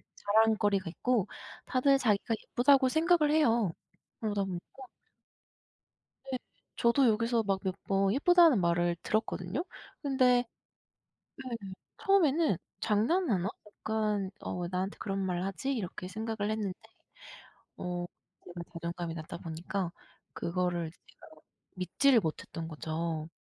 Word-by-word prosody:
자랑거리가 205 -3 +2
있고 235 +3 0 0.4
다들 275 +2 +3
자기가 225 -1 +1
예쁘다고 260 +1 +4
생각을 320 0 +3
해요. 235 - +3 0.5
그러다 205 -3 0
보니까 180 -2 -4 1.7
네. 255 - 0 0.4
저도 240 +3 +4
여기서 230 +1 +2
막 195 -1 0
몇 190 - 0
번 195 0 +2
예쁘다는 330 - +6
말을 170 0 +2
들었거든요. 215 - -1 0.4
근데 255 -3 +3 1.0
네. 250 -3 -4 0.4
처음에는 325 - +3 0.2
'장난하나? 215 - +1 0.2
약간 210 -2 -2
어 180 - -4
왜 175 - -2
나한테 185 +2 -2
그런 195 -2 -2
말 185 -2 -1
하지?' 195 +8 -2
이렇게 185 -5 -4
생각을 215 +1 -3
했는데 210 -4 -2 1.0
어 175 0 -3 0.4
제가 175 0 -8
자존감이 170 0 -4
낮다 160 +1 -6
보니까 170 +2 -4 0.4
그거를 175 -1 -1
이제 165 - -20
제가 - - -17 0.5
믿지를 230 - +3
못 160 -6 -3
했던 165 -1 -7
거죠. 160 0 -3
205 Hz, 270 characters per minute, -31 LUFS, 180-250 Hz, 1.7 s, 예쁘다는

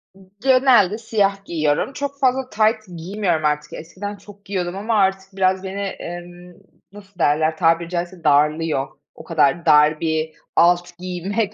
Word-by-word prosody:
I - - -19 0.2
genelde 255 -7 +4
siyah 200 -3 -1
giyiyorum, 155 - -1
çok 280 0 -5
fazla 260 -1 +1
tayt 220 0 +2 0.2
giymiyorum 175 -2 -1
artık, 150 0 -1
eskiden 195 +5 -7
çok 205 0 -16
giyiyordum 185 -2 -3
ama 220 +3 -1
artık 195 -1 0
biraz 190 0 +1
beni, 195 +1 -5
emm, 175 -2 -8 0.4
nasıl 200 -2 -16
derler 155 +1 +2
tabiri 165 0 +2
caizse 175 0 -4
darlıyor. 150 -1 +2 0.3
O - - -12
kadar 160 0 +1
dar 150 0 +5
bir 160 -1 -1 0.2
alt 175 0 +3
giymek 190 +4 -3
180 Hz, 145 wpm, -21 LUFS, 165-205 Hz, 0.4 s, dar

